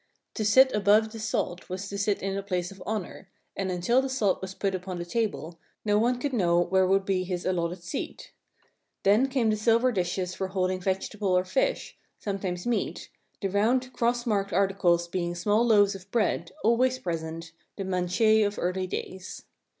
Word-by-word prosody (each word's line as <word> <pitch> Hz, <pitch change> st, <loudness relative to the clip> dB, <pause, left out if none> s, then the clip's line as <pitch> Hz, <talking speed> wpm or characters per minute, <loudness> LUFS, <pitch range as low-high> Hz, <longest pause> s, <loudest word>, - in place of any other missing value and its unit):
To 220 Hz, -, -2 dB
sit 260 Hz, +5 st, +6 dB
above 210 Hz, +2 st, +3 dB
the 225 Hz, -, -8 dB
salt 210 Hz, -5 st, -2 dB
was 190 Hz, +2 st, -4 dB
to 200 Hz, -, -6 dB
sit 200 Hz, -1 st, 0 dB
in 195 Hz, 0 st, -1 dB
a 200 Hz, -, -2 dB
place 180 Hz, -2 st, -2 dB
of 195 Hz, -1 st, -13 dB
honor, 200 Hz, -3 st, -4 dB, 0.3 s
and 195 Hz, -1 st, -2 dB
until 185 Hz, +9 st, +2 dB
the 270 Hz, -, -3 dB
salt 220 Hz, -8 st, +1 dB
was 190 Hz, 0 st, -6 dB
put 195 Hz, -1 st, -1 dB
upon 185 Hz, 0 st, -4 dB
the 175 Hz, -, -4 dB
table 175 Hz, -5 st, -3 dB, 0.3 s
no 210 Hz, 0 st, +3 dB
one 245 Hz, +3 st, +2 dB
could 275 Hz, +2 st, -3 dB
know 175 Hz, -7 st, +3 dB
where 185 Hz, +2 st, +2 dB
would 195 Hz, +1 st, +2 dB
be 190 Hz, -2 st, 0 dB
his 180 Hz, -1 st, -4 dB
allotted 175 Hz, -1 st, -1 dB
seat. 340 Hz, -, -6 dB, 0.7 s
Then 210 Hz, +7 st, +4 dB
came 255 Hz, -5 st, +1 dB
the -, -, +1 dB
silver 230 Hz, +4 st, +3 dB
dishes 180 Hz, -2 st, -2 dB
for 190 Hz, 0 st, -3 dB
holding 185 Hz, -1 st, -1 dB
vegetable 190 Hz, +1 st, 0 dB
or 180 Hz, -, +1 dB
fish, -, -, -1 dB, 0.2 s
sometimes 190 Hz, -3 st, -4 dB
meat, 240 Hz, -1 st, -2 dB, 0.3 s
the -, -, +2 dB
round 220 Hz, +6 st, +2 dB
round 255 Hz, -, -17 dB
cross 240 Hz, +1 st, 0 dB
marked 200 Hz, -3 st, 0 dB
articles 180 Hz, -3 st, +2 dB
being 175 Hz, 0 st, -2 dB
small 205 Hz, +6 st, +2 dB
loaves 205 Hz, -4 st, +4 dB
of 195 Hz, 0 st, -11 dB
bread, 210 Hz, -6 st, 0 dB
always 250 Hz, +4 st, +3 dB
present, 165 Hz, -4 st, -5 dB, 0.3 s
the 195 Hz, -, -3 dB
"manchet" 190 Hz, +4 st, +2 dB
of 205 Hz, 0 st, -1 dB
early 185 Hz, +1 st, -1 dB
days. 185 Hz, +1 st, -6 dB
195 Hz, 190 wpm, -27 LUFS, 180-220 Hz, 0.7 s, sit